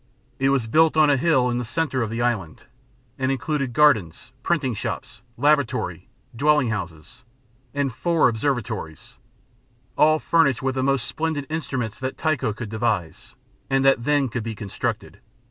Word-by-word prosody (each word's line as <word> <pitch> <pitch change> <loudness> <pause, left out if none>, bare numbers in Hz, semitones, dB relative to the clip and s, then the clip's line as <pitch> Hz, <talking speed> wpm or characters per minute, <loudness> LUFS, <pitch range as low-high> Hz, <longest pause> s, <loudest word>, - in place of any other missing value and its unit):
It 135 0 +2
was 135 -4 +1
built 160 +7 +3
on 155 -2 +5
a - - +4
hill 130 -3 +2
in 120 - -1
the - - -2
centre 135 +1 -1
of 115 - -1
the 115 +2 -2
island, 100 -10 -2 0.6
and 130 0 +1
included 135 0 -2
gardens, 115 - +2
printing 145 -8 0
shops, 105 - -5 0.2
laboratory, 145 -1 0 0.3
dwelling 150 0 +3
houses, 90 - -6 0.5
and 140 -2 -1
four 170 +5 +2
observatories 115 - -3 0.8
all 155 +1 +4
furnished 155 -6 +2
with 135 0 0
the 130 - -1
most 135 -3 +1
splendid 150 +3 -3
instruments 130 -8 -3
that 130 0 -4
Tycho 155 -8 0
could 110 +1 -7
devise, 105 -7 -3 0.3
and 135 0 +2
that 135 - +6
could 120 - -10
then 145 -2 +2
be 110 0 -5
constructed. 100 -1 -4
130 Hz, 155 wpm, -23 LUFS, 115-150 Hz, 0.8 s, that